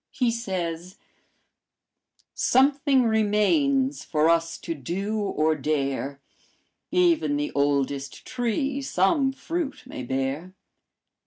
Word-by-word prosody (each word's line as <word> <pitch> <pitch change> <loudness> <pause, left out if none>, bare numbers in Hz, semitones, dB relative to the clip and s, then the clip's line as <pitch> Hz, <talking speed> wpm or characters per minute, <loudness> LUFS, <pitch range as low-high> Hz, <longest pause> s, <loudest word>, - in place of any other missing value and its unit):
He 245 -3 0
says: 185 -6 -4 1.4
"'Something 275 0 +3
remains 260 +6 +2
for 155 0 +2
us 165 0 0
to 165 - -4
do 190 - -3
or 160 -6 +1
dare; 140 -1 -2 0.7
Even 335 -5 +2
the 295 +1 -2
oldest 140 -1 -1
tree 255 +3 -1
some 265 - +2
fruit 320 +1 -4
may - - -7
bear. 135 +8 -3
205 Hz, 95 wpm, -25 LUFS, -, 1.4 s, Something